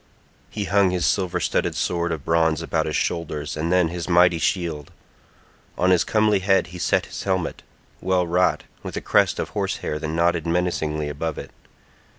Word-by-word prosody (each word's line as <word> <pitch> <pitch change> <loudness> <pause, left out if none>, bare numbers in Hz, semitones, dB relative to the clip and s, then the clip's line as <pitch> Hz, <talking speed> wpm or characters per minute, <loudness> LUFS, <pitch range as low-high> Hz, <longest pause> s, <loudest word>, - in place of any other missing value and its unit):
He 105 - -4
hung 100 -1 +3
his 90 -2 -1
silver 95 -3 0
studded - - 0
sword 85 -1 -1
of 80 -4 -4
bronze 80 -1 +2
about 80 -1 -1
his 75 - -2
shoulders, 75 -3 -2
and 80 +3 -2
then 90 -2 +3
his 85 0 -5
mighty 90 -1 +4
shield. 80 -5 -2 0.9
On 90 +1 +3
his 90 - +4
comely 105 -2 +2
head 95 -1 +2
he 90 - -7
set - - +1
his - - -7
helmet, 95 -3 -2 0.4
well 90 0 +1
wrought, 90 +2 +1 0.2
with - - -6
a - - -3
crest - - +2
of - - -3
horse - - -2
hair 75 - -2
that 80 - -4
nodded 85 +1 0
menacingly 80 -3 -1
above 75 +2 -4
it. - - -8
85 Hz, 180 wpm, -23 LUFS, 80-90 Hz, 0.9 s, mighty